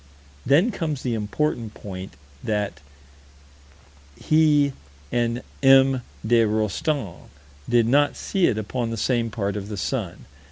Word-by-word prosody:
Then 165 - +4
comes 155 - -3
the 125 - -1
important 115 +1 -2
point: 95 -2 -8 0.3
that 105 -2 -2 1.4
he 150 -3 +3 0.4
and 120 0 0 0.2
M. 135 -1 +5 0.2
de 115 +1 +4
Rostan 110 - -2 0.4
did 120 -1 +3
not 145 +4 +3
see 190 -3 +1
it 110 - 0
upon 115 +2 -3
the 115 - -4
same 120 0 0
part 100 -3 -3
of 100 0 -5
the 105 - -5
sun. - - -3
120 Hz, 125 wpm, -23 LUFS, 105-140 Hz, 1.4 s, M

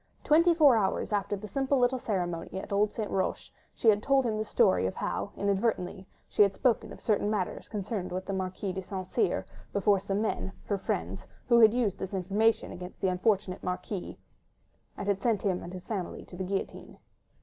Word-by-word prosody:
Twenty 335 +3 +5
four 290 -7 +6
hours 205 0 0
after 205 0 0
the 210 +2 -7
simple 270 +4 +1
little 250 +1 +2
ceremony 180 -4 -2
at - - -9
old 205 +1 +3
St. 215 -2 -4
Roch, 190 - 0 0.4
she 225 - +4
had 205 -1 +4
told 270 +1 +3
him 225 -2 0
the - - 0
story 95 - +3
of 95 - -4
how, 200 - -3
inadvertently, 195 -2 -1 0.2
she - - +1
had 200 -1 +5
spoken 250 -4 +1
of - - -10
certain 210 -1 +1
matters 205 -4 -2
connected 205 -2 -3
with 185 +1 -3
the 195 - -3
Marquis 190 0 -3
de 190 - -3
St. 185 0 -5
Cyr 405 - 0 0.3
before 200 0 +3
some 195 +1 -2
men—her 205 -1 -2
friends—who 95 - -1
had 220 0 +7
used 225 -7 0
this 190 +1 -4
information 205 +5 +1
against 180 +1 -9
the 190 - +1
unfortunate 185 0 0
Marquis, 180 +1 -4 0.8
and 200 -1 -1
sent 225 -5 +1
him 185 -3 0
and 175 - -8
his 185 -1 -8
family 195 -6 -4
to - - -12
the 185 +1 -3
guillotine. 195 +1 -4
200 Hz, 190 wpm, -29 LUFS, 185-220 Hz, 0.8 s, had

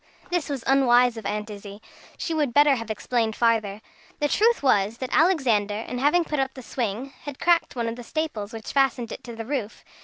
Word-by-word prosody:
This 350 -5 -1
was 275 -4 -3
unwise 250 -3 +4
of 225 - -5
Aunt 210 0 -3
Izzie. 205 0 -9 0.4
She 330 - -3
would 295 -6 0
better 290 -1 +6
have 230 -4 -4
explained 220 +1 -1
farther. 220 -3 +1 0.4
The 295 - +1
truth 455 0 +2
was, 210 -4 +2
that 255 0 -5
Alexander, 245 - +3
in 235 +3 -5 0.2
putting 300 -3 -3
up 265 0 -1
the 260 - -9
swing, 245 +3 -3
had 290 -2 -6
cracked 340 -4 +2
one 235 -2 -1
of 230 +1 -4
the 245 - -8
staples 235 -8 -3
which 225 -2 -7
fastened 270 -4 +1
it - - -8
to 235 -2 -8
the 225 0 -6
roof. 245 -5 -4
245 Hz, 205 wpm, -25 LUFS, 220-280 Hz, 0.4 s, better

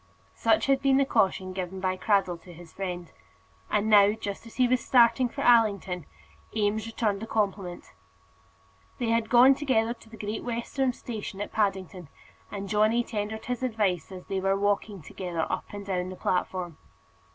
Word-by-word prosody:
Such - - +2
had 275 -1 +2
been 270 -1 +4
the 275 - +3
caution 190 -6 +1
given 185 0 -5
by 185 0 0
Cradell 185 -3 +1
to 180 - -13
his 170 0 -14
friend. 180 -3 -5 0.6
And 210 +1 +1
now, 205 -1 +6
just 210 0 -6
as 230 - -14
he 255 -1 +3
was 250 -1 +1
starting 245 0 +4
for 280 - -6
Allington, 200 -8 +3 0.5
Eames 215 0 0
returned 215 -3 -1
the 225 - -5
compliment. 195 - -2 1.0
They 235 - -1
had 230 -1 +1
gone 250 +2 +7
together 245 -5 +1
to 225 -1 -19
the 225 - -12
Great 210 +1 -4
Western 245 +2 -1
station 215 -5 -7
at 205 - -4
Paddington, 190 -4 -1 0.4
and 200 -1 -6
Johnny 215 +3 +2
tendered 220 0 -4
his 250 0 -3
advice 210 -9 -1
as 185 -1 -9
they 195 -1 -2
were 195 +1 +1
walking 205 -2 -1
together 175 +1 -4
up - - -2
and 205 -1 -7
down 185 -2 -2
the 185 - -7
platform. 180 -2 -2
205 Hz, 175 wpm, -27 LUFS, 190-230 Hz, 1.0 s, gone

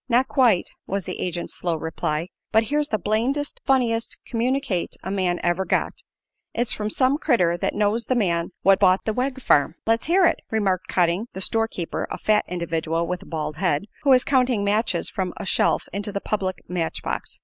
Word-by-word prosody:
"Not 250 +2 +3
quite," 240 -10 +3 0.2
was 195 0 -2
the 180 - -6
agent's 175 -1 -3
slow 170 -2 -1
reply; 160 +1 -3 0.2
"but 220 - +4
here's 295 +5 0
the 215 - 0
blamedest 235 +9 -1
funniest 235 -4 +1
communicate 245 -5 -1
a 190 - -4
man 185 -3 0
ever 175 +2 +1
got! - - 0 0.6
It's 240 +1 +1
from 210 0 -3
some 260 +6 +2
critter 185 - +2
that - - -2
knows 210 +2 +1
the 255 - 0
man 170 -7 +1
what 195 0 +5
bought 185 -2 +4
the 220 - 0
Wegg 255 +3 -1
farm." 155 - +3
"Let's 225 +3 +1
hear 365 +2 +5
it," - - +2
remarked 195 -4 0
Cotting, 180 +5 +1
the 190 - -6
store 225 +3 +2
keeper, 175 -6 -4
a - - -4
fat 210 -1 +2
individual 165 -1 -1
with 180 +1 -3
a - - -13
bald 150 -2 -4
head, 175 -2 0 0.2
who 285 - +1
was 255 -1 +6
counting 250 -6 +2
matches 205 -3 +1
from 185 -2 -3
a 205 - -5
shelf - - +2
into 200 +1 -2
the 200 - -2
public 190 -3 -3
match 175 -3 -2
box. - - -4
200 Hz, 195 wpm, -23 LUFS, 175-240 Hz, 0.6 s, was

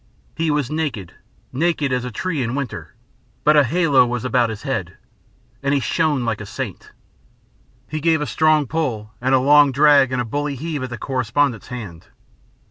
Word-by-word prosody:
He 165 0 -1
was 145 -3 0
naked, 140 - -3 0.4
naked 155 -1 0
as 125 -1 0
a - - -3
tree 155 +5 -3
in 120 +1 -2
winter, 140 -4 -5 0.5
but 150 - +5
a 145 - +6
halo 150 -1 +3
was 125 0 -3
about 125 -2 +2
his 110 -2 -7
head, - - -3 0.6
and 140 0 +1
he - - +2
shone 145 -1 0
like 110 -2 -2
a - - -6
saint. - - -6 1.0
He 155 0 -4
gave 165 0 +3
a 150 - -2
strong 155 -1 +2
pull, 120 -9 -3
and 130 +1 +3
a - - +4
long 145 +1 +5
drag, 140 -1 +5
and 130 - -1
a 120 - -1
bully 145 +4 -3
heave 155 +1 -4
at 130 - -4
the 120 - -6
correspondent's 130 0 -1
hand. 100 -10 -8
140 Hz, 185 wpm, -20 LUFS, 125-150 Hz, 1.0 s, a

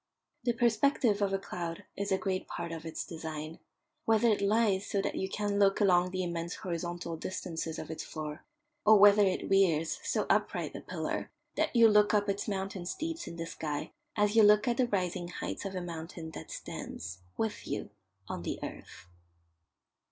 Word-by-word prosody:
The 240 - +3
perspective 235 -2 +3
of 200 -1 +2
a 195 - +2
cloud 170 -3 -5
is 200 0 -2
a 190 - +4
great 190 -1 -2
part 170 -1 -5
of 165 0 -6
its 160 - -4
design 160 -1 -6 0.5
whether 225 +1 +4
it 210 -2 +2
lies 205 -1 +2
so 200 - 0
that - - -1
you 190 - -2
can 205 0 -1
look 195 -1 +4
along 180 -3 +4
the 185 0 -2
immense 170 0 -3
horizontal 175 -1 -4
distances 165 -2 -4
of - - -6
its 160 - -4
floor, 155 +1 -6 0.4
or 215 0 +8
whether 205 +1 +8
it 190 -2 +1
rears 170 -5 +3
so - - 0
upright - - +1
a - - -5
pillar - - -3 0.3
that - - 0
you 230 -1 +8
look 210 0 +5
up 205 0 +2
its 200 +1 -1
mountain 195 -3 -3
steeps 330 - -3
in - - -6
the 165 0 -4
sky 150 -3 -4 0.2
as 210 0 +2
you 225 - +8
look 210 +1 +6
at 240 -1 +2
the 255 - +3
rising 180 -4 -1
heights 180 - -5
of 195 -1 -4
a 185 - -2
mountain 165 -1 -6
that - - -9
stands, 90 +2 -6 0.2
with 220 -2 -2
you, - - -3 0.4
on - - -4
the - - -3
earth. - - -8
190 Hz, 190 wpm, -31 LUFS, 170-210 Hz, 0.5 s, or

